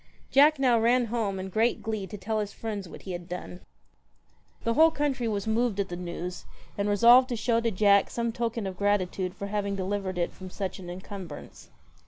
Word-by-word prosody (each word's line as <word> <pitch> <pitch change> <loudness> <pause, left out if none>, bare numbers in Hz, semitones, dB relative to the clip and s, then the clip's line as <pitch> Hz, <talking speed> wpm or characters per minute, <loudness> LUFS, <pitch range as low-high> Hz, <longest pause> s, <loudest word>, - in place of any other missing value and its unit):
Jack 295 +3 +6
now 250 -4 +3
ran 240 +2 +3
home 205 -5 -1
in 190 0 -5
great 225 +5 +1
glee 215 -3 -3
to 210 - -7
tell 215 +3 -2
his 205 -1 -3
friends 205 -5 -5
what - - -11
he 190 - -6
had 175 0 -6
done. 180 0 -6 1.0
The 230 - +1
whole 320 +6 +6
country 285 -6 -1
was 205 -3 -2
moved 220 -1 0
at 195 - -1
the 175 - -4
news, 175 0 -6 0.3
and 200 0 -1
resolved 240 +5 +6
to 245 - -1
show 230 +1 +1
to 230 - +1
Jack 200 -1 +4
some 235 -1 -2
token 230 -2 -2
of 190 -1 -5
gratitude 190 -2 0
for 200 - -5
having 200 -1 -2
delivered 190 -1 -3
it 175 - 0
from 185 -1 -9
such 190 0 -5
an 180 -2 -8
encumbrance. 185 +1 -9
205 Hz, 205 wpm, -27 LUFS, 190-230 Hz, 1.0 s, Jack